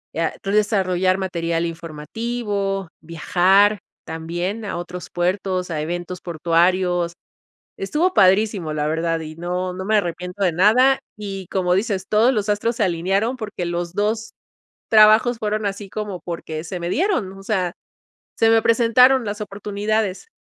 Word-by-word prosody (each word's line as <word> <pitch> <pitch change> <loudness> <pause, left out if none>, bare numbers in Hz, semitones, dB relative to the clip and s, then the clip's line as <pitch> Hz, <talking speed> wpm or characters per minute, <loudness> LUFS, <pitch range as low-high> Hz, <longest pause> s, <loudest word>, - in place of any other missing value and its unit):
ah, 165 0 0
entonces 205 +2 +1
desarrollar 185 -2 +1
material 170 -3 -1
informativo, 195 +5 -4
viajar 190 +5 +3 0.3
también 175 +7 -4
a - - -4
otros 175 0 -7
puertos 180 0 -1
a 155 - -2
eventos 175 +2 -4
portuarios. 175 +1 +1 0.6
Estuvo 310 - 0
padrísimo, 190 -4 +3
la 150 0 -1
verdad 165 +1 0
y 155 0 -8
no, 180 +2 -3
no 190 +1 -6
me 215 0 +3
arrepiento 180 +1 -3
de 180 - +3
nada, 240 +10 +5 0.2
y 195 -3 -6
como 180 -2 +1
dices, 195 -1 -1
todos 225 +5 +4
los 210 -1 -1
astros 225 +3 0
se 220 - +2
alinearon 195 +8 0
porque 205 -5 -5
los 175 0 -3
dos 220 +2 -1 0.6
trabajos 220 +2 +6
fueron 215 -1 -1
así 200 0 -4
como 205 -4 -5
porque 160 -2 -6
se 175 +1 -5
me 170 - -3
dieron, 330 - 0
o 195 - -12
sea, 185 -4 -1 0.6
se 225 - +4
me 225 0 +5
presentaron 245 +2 +4
las 205 +1 -4
oportunidades. 205 - -2
190 Hz, 145 wpm, -21 LUFS, 175-215 Hz, 0.6 s, trabajos